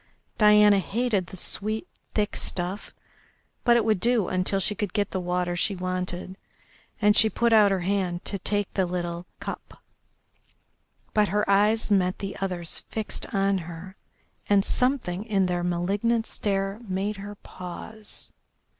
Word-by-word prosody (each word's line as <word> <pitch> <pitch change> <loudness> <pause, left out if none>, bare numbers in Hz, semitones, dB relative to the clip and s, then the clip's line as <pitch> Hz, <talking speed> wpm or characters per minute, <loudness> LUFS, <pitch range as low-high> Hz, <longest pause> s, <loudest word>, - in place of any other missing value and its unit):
Diana 210 -1 +7
hated 205 -1 0
the 190 - -10
sweet, 215 +4 -2 0.3
thick 210 -1 0
stuff, 185 +3 -2 0.7
but 240 -1 +5
it 225 - +1
would 215 -4 +2
do 235 -2 +2
until 185 +1 +1
she 210 - +1
could 205 -2 -3
get 205 -1 0
the 190 - -1
water 180 0 -1
she 195 +3 0
wanted, 185 0 -4 0.6
and 210 -1 +4
she 220 0 +6
put 235 +1 +2
out 210 -2 +7
her 195 -2 0
hand 180 -2 -1
to 200 - -2
take 205 +1 -1
the 190 -2 +1
little 175 0 -4
cup. - - -8 1.3
But 210 -1 +4
her 210 +1 0
eyes 210 +3 +3
met 185 -2 +3
the 195 0 -5
other's 180 -3 -2
fixed 220 -1 -4
on 195 -1 +2
her, 175 +3 -9 0.5
and 200 -1 +4
something 250 -8 0
in 200 -4 +1
their 175 -1 -1
malignant 200 +7 0
stare 195 -1 -1
made 195 +3 -1
her 205 +1 -7
pause. 205 +4 -6
195 Hz, 150 wpm, -26 LUFS, 180-210 Hz, 1.3 s, Diana